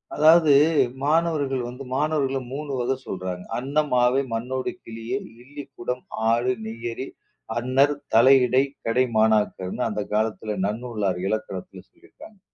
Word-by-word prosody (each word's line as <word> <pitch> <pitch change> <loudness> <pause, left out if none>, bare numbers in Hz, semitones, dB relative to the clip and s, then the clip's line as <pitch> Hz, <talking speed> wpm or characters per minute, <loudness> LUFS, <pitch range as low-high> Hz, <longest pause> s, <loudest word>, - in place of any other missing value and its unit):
அதாவது 160 +1 +6 0.5
மாணவர்கள் 145 -4 +1
வந்து 125 +3 -8
மாணவர்கள 140 -2 0 0.2
3 145 +1 -5
வக 125 +2 0
சொல்றாங்க. 90 -1 -5
"அன்னமாவே, 130 -1 +2
மண்ணோடு 130 +7 -2
கிளியே, 115 - -4 0.2
இல்லிக்குடம், 135 -2 -7 0.3
ஆடு, 120 +2 +2
நெய்யறி, 115 +3 -5 0.5
அன்னர், 135 +4 +2 0.2
தலை 130 +4 +7
இடை, 130 +2 +3 0.2
கடை 125 +3 +3
மாணாக்கர்னு" 110 0 +1
அந்தக் 105 -1 -4
காலத்துல 110 -1 -1
நன்னூல்னார் 105 -5 -2
இலக்கியத்துல 100 -3 -4
சொல்லி - - -24
இருக்காங்க. 215 -2 -15
125 Hz, 115 wpm, -24 LUFS, 110-140 Hz, 0.5 s, தலை